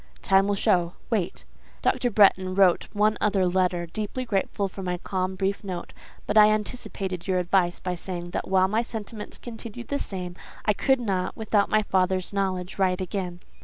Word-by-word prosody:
"Time 195 0 +4
will 205 - +1
show. 175 -3 +2 0.2
Wait." 195 -6 -1 0.4
"Dr. 245 - +2
Bretton 190 -3 +4
wrote 190 -3 +4
one 210 +1 +2
other 200 -3 +2
letter, 180 -1 +1
deeply 215 +8 -4
grateful 200 -2 0
for 195 +1 -8
my 180 -1 -2
calm, 185 +1 -2
brief 195 +2 -1
note; 180 -3 -6 0.3
but 215 - +4
I 210 0 +8
anticipated 200 -4 -3
your 185 -1 +2
advice, 180 0 +2
by 180 - -3
saying, 175 -1 -5
that - - -3
while 190 0 +4
my 215 +4 +1
sentiments 220 -2 -6
continued 235 0 -8
the 285 - -1
same, 180 -2 -5 0.3
I 210 - +4
could 265 +5 +2
not, 190 -6 -2
without 215 -2 +1
my 215 0 +3
father's 185 -1 0
knowledge, 190 -1 -2
write 185 -1 +2
again." 180 -1 -4
190 Hz, 175 wpm, -26 LUFS, 180-210 Hz, 0.4 s, I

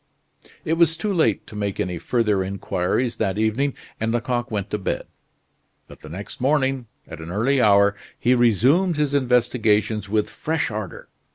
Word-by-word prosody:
It 160 - +1
was 165 -1 +3
too 210 +2 -1
late 135 - +1
to - - -12
make 100 -2 -3
any 90 -1 -2
further 105 -4 +1
inquiries 100 +4 -1
that 95 +1 -1
evening, 115 +6 0 0.2
and 110 +1 0
Lecoq 120 +1 -1
went 105 -3 -3
to 105 - -1
bed; 95 - -2 0.8
but - - -14
the 75 - -12
next 100 +8 -8
morning, 135 -2 +1 0.2
at - - -9
an 80 - -8
early 125 +8 +1
hour, 100 -1 +5 0.2
he 125 - +2
resumed 130 - +3
his 150 -2 0
investigations 115 -5 +1
with 105 0 +1
fresh 160 -5 -2
ardor. 105 -4 -6
115 Hz, 165 wpm, -23 LUFS, 100-135 Hz, 0.8 s, hour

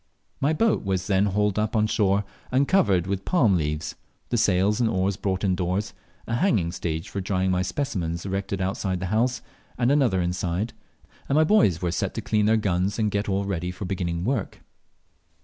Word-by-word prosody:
My 140 +3 +2
boat 220 +7 +2
was 95 -2 -1
then 95 +1 +2
hauled 105 +1 +1
up 105 +1 -1
on 105 -1 +3
shore, 100 -2 +2 0.3
and 135 +2 +3
covered 100 - +3
with 95 0 -2
palm 120 - +3
leaves, 75 -2 -2 0.4
the - - 0
sails 100 +2 +2
and 115 - +3
oars 95 -2 0
brought 95 -1 -2
indoors, 95 +1 0 0.3
a 115 - -1
hanging 105 - +2
stage 80 -2 -3
for 100 - -4
drying 95 -1 0
my 90 0 +1
specimens 95 - -2
erected 95 0 -3
outside 95 -1 -1
the 90 - -3
house 120 +2 +1 0.3
and 125 +1 +2
another 130 -10 +3
inside, 90 +5 -1 0.6
and 140 - +2
my 155 - +5
boys 155 - +3
were 85 - 0
set - - -2
to - - -2
clean 105 -1 +1
their 110 +1 +4
gnus 95 -1 0
and 105 -2 +1
get 100 +1 -1
all 100 +1 0
ready 90 -3 -2
for 90 +2 -6
beginning 90 -2 -2
work. 125 -4 -2
100 Hz, 190 wpm, -25 LUFS, 90-110 Hz, 0.6 s, my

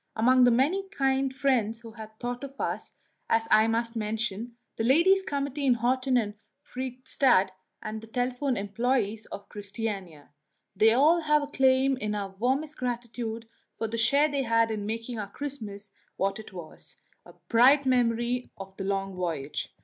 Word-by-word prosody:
Among 250 +3 +5
the - - +6
many 315 +12 +1
kind 270 -5 +1
friends 245 -5 0
who 230 -1 -10
had 220 -1 -11
thought 245 +1 -4
of 275 0 -9
us - - -3 0.4
I 225 -1 +4
must 230 +1 -1
mention 225 +1 -3 0.2
the 225 - -2
Ladies' 340 +10 +5
Committees 280 -4 -3
in 250 -2 +4
Horten 255 +2 +1
and 210 -3 -1 0.3
Fredrikstad, 255 -5 +1 0.3
and 215 0 -5
the 225 - -12
telephone 250 +3 -1
employées 220 +1 -1
of 200 - -8
Christiania. 200 -7 -6 0.4
They 220 +3 +5
all 305 +7 +5
have 300 -1 +3
a - - -4
claim 265 -1 +3
to 210 -4 -2
our 200 -1 -3
warmest 265 +9 -1
gratitude 235 -2 -4 0.3
for 225 - -2
the 230 +1 -3
share 280 +6 +4
they 285 -2 -1
had 230 -2 +2
in 205 -2 -3
making 230 +1 -4
our 200 -1 -5
Christmas 210 -7 -6 0.3
what 195 +2 0
it 220 - -10
was 175 -4 -11 0.3
a - - -15
bright 265 +5 +5
memory 245 -1 +1
of 195 0 -9
the 195 - -4
long 195 0 -2
voyage. 165 -6 -3
235 Hz, 165 wpm, -28 LUFS, 215-265 Hz, 0.4 s, the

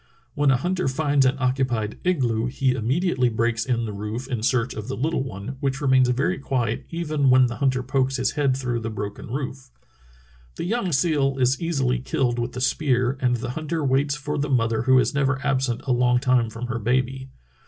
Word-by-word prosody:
When 145 +1 +2
a 135 - +4
hunter 180 +6 -1
finds 140 0 +2
an 130 - +1
occupied 125 -5 -1
igloo 125 -10 +1
he 130 +1 0
immediately 130 - +1
breaks 115 0 -1
in 120 -2 0
the 105 - -5
roof 105 +5 -5
in 125 -5 -3
search 120 +1 +1
of 110 0 -6
the 135 - -4
little 150 +3 0
one, 130 +1 -6
which 135 -1 -1
remains 130 -3 +3
very 130 +3 0
quiet 125 -5 -2
even 155 -5 0
when 130 0 +6
the 120 -1 -3
hunter 130 -2 +1
pokes 130 +1 0
his 130 - 0
head 140 -3 +1
through 125 -3 -2
the 115 0 -4
broken 105 -2 -6
roof. 130 0 -5 0.9
The - - -4
young 195 0 -1
seal 140 -2 +1
is 130 0 +1
easily 135 -7 0
killed 125 -1 -1
with 120 +1 -3
the 125 - -5
spear, 130 -1 +1
and 125 -1 +2
the 120 +1 -4
hunter 155 +2 -3
waits 140 +2 +1
for 150 +1 -4
the 145 0 -1
mother 115 -4 +1
who 130 +2 +4
is 130 - +2
never 140 -1 +1
absent 130 -4 0
a 135 - -2
long 125 0 +3
time 125 -3 +2
from 115 +2 -6
her 120 -1 -3
baby. 130 +3 -1
130 Hz, 205 wpm, -24 LUFS, 120-140 Hz, 0.9 s, when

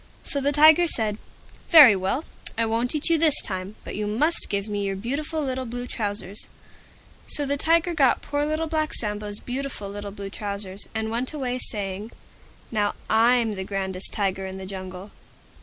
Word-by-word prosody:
So 280 - -2
the 280 +1 +2
Tiger 310 +4 +7
said, 220 -7 -1 0.5
"Very 290 - +10
well, 195 - -1 0.3
I 230 - +3
won't 230 +4 0
eat 300 - +1
you 330 - +4
this 315 -3 +4
time, 190 +1 -5
but - - -6
you 210 0 -2
must 300 +11 0
give 200 0 -1
me 205 -1 -2
your 195 -1 -1
beautiful 290 +9 -3
little 260 -2 -3
Blue 245 +1 -5
Trousers." 205 -4 -1 0.8
So 290 - -1
the 280 +1 0
Tiger 335 +4 +2
got 275 -6 +3
poor 290 0 -1
Little 310 +2 -1
Black 310 -1 -1
Sambo's 210 -1 -3
beautiful 255 -5 -4
little 205 0 -6
Blue 200 -1 -8
Trousers, 200 -1 -3
and 220 0 -2
went 245 +5 -2
away 255 -4 -2
saying, 205 0 -2 0.6
"Now 210 -2 0 0.2
I'm 230 0 +4
the 190 -1 -4
grandest 190 -1 -1
Tiger 195 -2 -1
in 190 0 -7
the 190 - -7
Jungle." 185 0 -8
220 Hz, 175 wpm, -24 LUFS, 200-280 Hz, 0.8 s, Very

